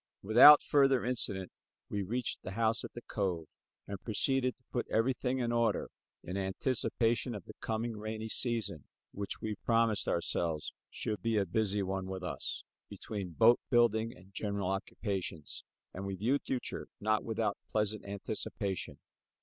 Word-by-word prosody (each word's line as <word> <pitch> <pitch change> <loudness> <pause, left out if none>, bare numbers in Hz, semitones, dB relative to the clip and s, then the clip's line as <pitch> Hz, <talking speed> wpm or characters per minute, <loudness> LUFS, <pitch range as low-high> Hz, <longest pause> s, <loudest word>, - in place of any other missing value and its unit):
Without 120 +8 +10
further 135 -4 +4
incident 100 -7 -1 0.4
we 100 - -2
reached 115 +5 -2
the 95 - -6
house 115 +1 +1
at - - -7
the 120 - -8
cove 90 -6 -2 0.4
and 100 -1 -6
proceeded 130 +3 0
to 125 - -36
put 120 - -1
everything 125 +2 +1
in 120 -2 0
order 115 -2 +1 0.3
in 90 +2 -4
anticipation 115 +4 0
of 100 - -7
the - - -10
coming 115 +1 -2
rainy 110 +1 -4
season 110 - -2 0.3
which, 100 0 -5
we 110 - -1
promised 115 -3 +2
ourselves 85 -2 -1 0.2
should 105 -1 -3
be 115 -1 +1
a 100 - +3
busy 105 +1 0
one 95 0 -2
with 95 -1 -5
us, 90 - -4 0.3
between 100 -5 -6
boat 115 +6 +6
building 115 -2 +3
and 95 +2 -18
general 100 -2 -2
occupations; 95 -5 -4 0.3
and 95 +2 -5
we 95 - -2
viewed 120 +9 +1
the - - -54
future 130 -2 -3
not 110 +1 +1
without 110 -2 0 0.2
pleasant 105 0 0
anticipations. 100 -1 -4
110 Hz, 155 wpm, -33 LUFS, 95-115 Hz, 0.4 s, Without